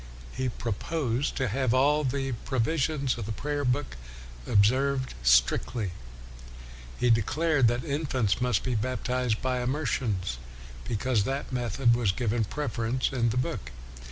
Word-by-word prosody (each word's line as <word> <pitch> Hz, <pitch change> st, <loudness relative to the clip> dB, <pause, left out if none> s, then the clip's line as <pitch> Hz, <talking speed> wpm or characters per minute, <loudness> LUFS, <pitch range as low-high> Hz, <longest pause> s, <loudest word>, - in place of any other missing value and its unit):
He 130 Hz, -1 st, -1 dB
proposed 125 Hz, -, -2 dB
to 130 Hz, -, 0 dB
have 130 Hz, +2 st, +1 dB
all 145 Hz, +3 st, +3 dB
the 135 Hz, 0 st, -1 dB
provisions 135 Hz, +1 st, 0 dB
of 105 Hz, -, -4 dB
the -, -, -3 dB
prayer 145 Hz, +6 st, -2 dB
book 125 Hz, -, -1 dB, 0.5 s
observed 130 Hz, +6 st, +2 dB
strictly. 60 Hz, -, +2 dB, 1.1 s
He 125 Hz, -, +3 dB
de 115 Hz, 0 st, +4 dB
clared 155 Hz, +1 st, +2 dB
that 120 Hz, +4 st, 0 dB
infants 135 Hz, -, 0 dB
must 125 Hz, -4 st, +1 dB
be 130 Hz, -, -1 dB
baptized 125 Hz, 0 st, -1 dB
by 130 Hz, -1 st, 0 dB
immersion, 125 Hz, -5 st, 0 dB, 0.7 s
because 115 Hz, -1 st, 0 dB
that 135 Hz, 0 st, -3 dB
method 120 Hz, 0 st, +2 dB
was 115 Hz, -5 st, +2 dB
given 115 Hz, +1 st, 0 dB
the 105 Hz, -, -2 dB
preference 125 Hz, -3 st, -1 dB
in 120 Hz, -3 st, +1 dB
the 115 Hz, -, -2 dB
book. 125 Hz, -, -2 dB
125 Hz, 140 wpm, -28 LUFS, 115-135 Hz, 1.1 s, de